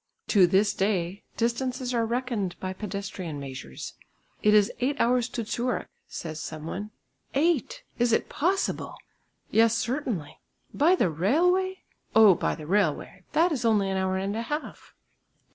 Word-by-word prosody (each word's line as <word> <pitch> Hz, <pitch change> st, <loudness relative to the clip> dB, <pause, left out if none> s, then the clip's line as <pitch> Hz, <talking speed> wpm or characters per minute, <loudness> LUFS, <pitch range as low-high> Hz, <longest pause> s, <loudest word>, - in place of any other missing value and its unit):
To 190 Hz, -5 st, +6 dB
this 200 Hz, +3 st, +3 dB
day 190 Hz, -1 st, -1 dB, 0.2 s
distances 250 Hz, +2 st, -1 dB
are 230 Hz, -1 st, +1 dB
reckoned 235 Hz, -6 st, -2 dB
by 185 Hz, 0 st, -3 dB
pedestrian 195 Hz, -6 st, -5 dB
measures. 130 Hz, -, -7 dB, 0.5 s
"It 210 Hz, 0 st, +5 dB
is 210 Hz, +1 st, +5 dB
eight 275 Hz, +3 st, 0 dB
hours 245 Hz, 0 st, +2 dB
to 230 Hz, -, -4 dB
Zurich," 240 Hz, +3 st, -2 dB, 0.2 s
says 160 Hz, -2 st, -6 dB
some 155 Hz, 0 st, -6 dB
one. 205 Hz, +5 st, -5 dB, 0.5 s
"Eight! 310 Hz, -2 st, +1 dB, 0.2 s
is 240 Hz, 0 st, +3 dB
it -, -, +2 dB
possible?" 375 Hz, +6 st, -1 dB, 0.6 s
"Yes, 230 Hz, +1 st, +4 dB
certainly." 240 Hz, -, -3 dB, 0.3 s
"By 335 Hz, +6 st, +4 dB
the 185 Hz, -, +1 dB
railway?" 360 Hz, -, +2 dB, 0.3 s
"Oh! 220 Hz, -3 st, +8 dB
by -, -, -1 dB
the 155 Hz, -, -9 dB
railway, 185 Hz, 0 st, 0 dB
that 335 Hz, +3 st, +4 dB
is 265 Hz, -6 st, -1 dB
only 210 Hz, -4 st, +2 dB
an 190 Hz, -, -1 dB
hour 190 Hz, 0 st, 0 dB
and 195 Hz, +2 st, -2 dB
a 225 Hz, -, -1 dB
half." 295 Hz, +6 st, -6 dB
215 Hz, 150 wpm, -27 LUFS, 190-250 Hz, 0.6 s, Oh